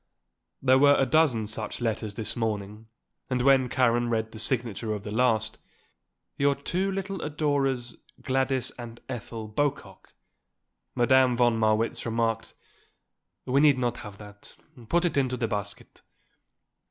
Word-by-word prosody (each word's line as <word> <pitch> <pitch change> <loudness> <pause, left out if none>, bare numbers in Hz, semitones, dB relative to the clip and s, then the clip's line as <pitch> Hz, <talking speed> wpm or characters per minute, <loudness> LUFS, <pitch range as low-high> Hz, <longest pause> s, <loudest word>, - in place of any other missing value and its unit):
There 130 0 +5
were 145 +1 +6
a 135 - +3
dozen 130 -6 +2
such 110 0 -4
letters 110 -3 -2
this 110 -2 -4
morning 105 -2 -3 0.4
and 125 -1 0
when 135 -2 +4
Karen 120 -1 +2
read 110 -1 -1
the 110 - -9
signature 115 -2 -1
of 100 - -7
the 105 - -6
last: 110 -1 +1 0.8
"Your 140 0 +3
two 180 +7 -2
little 195 -1 -4
adorers 140 -5 -1 0.2
Gladys 130 -1 0
and 120 -1 -8
Ethel 115 -3 -6
Bocock," 140 +6 -3 0.8
Madame 125 0 +4
von 120 -1 +3
Marwitz 110 0 +1
remarked: 115 -1 -2 0.9
"We 135 +2 +2
need 145 -3 +5
not 120 -1 -1
have 105 -3 -9
that. 105 -1 -14 0.3
Put 175 +1 +2
it 170 - -1
into 130 -2 +1
the 115 - -1
basket." 100 -1 -5
120 Hz, 140 wpm, -27 LUFS, 110-135 Hz, 0.9 s, were